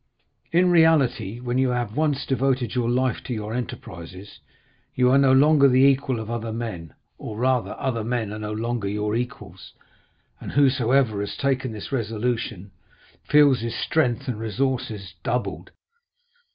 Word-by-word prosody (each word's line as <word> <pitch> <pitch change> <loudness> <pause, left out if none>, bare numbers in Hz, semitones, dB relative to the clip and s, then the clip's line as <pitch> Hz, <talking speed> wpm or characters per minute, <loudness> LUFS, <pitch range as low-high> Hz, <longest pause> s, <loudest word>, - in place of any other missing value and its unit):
In 180 +1 +4
reality, 135 - +3
when 125 +1 -2
you 130 -1 +2
have 120 -3 -2
once 150 -2 0
devoted 130 -3 0
your 120 -2 0
life 125 -1 0
to 125 - -3
your 110 0 -5
enterprises, 95 -5 -7 0.6
you 125 0 +3
are 135 - +5
no 135 -1 +4
longer 140 +1 +5
the 130 0 +4
equal 135 -3 +2
of 110 - -6
other 115 -1 -4
men, 110 - -6 0.2
or, 105 - -7
rather, 125 0 0
other 115 -4 -2
men 115 -2 -2
are 110 - -6
no 105 0 -5
longer 115 -1 -2
your 105 +1 -2
equals, 125 -6 -6 0.7
and - - -8
whosoever 130 -5 +2
has 100 0 -4
taken 130 -2 -1
this 110 +3 -8
resolution, 115 -4 -3 0.6
feels 145 -3 +5
his 115 +1 -4
strength 135 -3 0
and 120 -4 -3
resources 110 -4 -3
doubled." 95 -8 -3
120 Hz, 150 wpm, -24 LUFS, 110-135 Hz, 0.7 s, are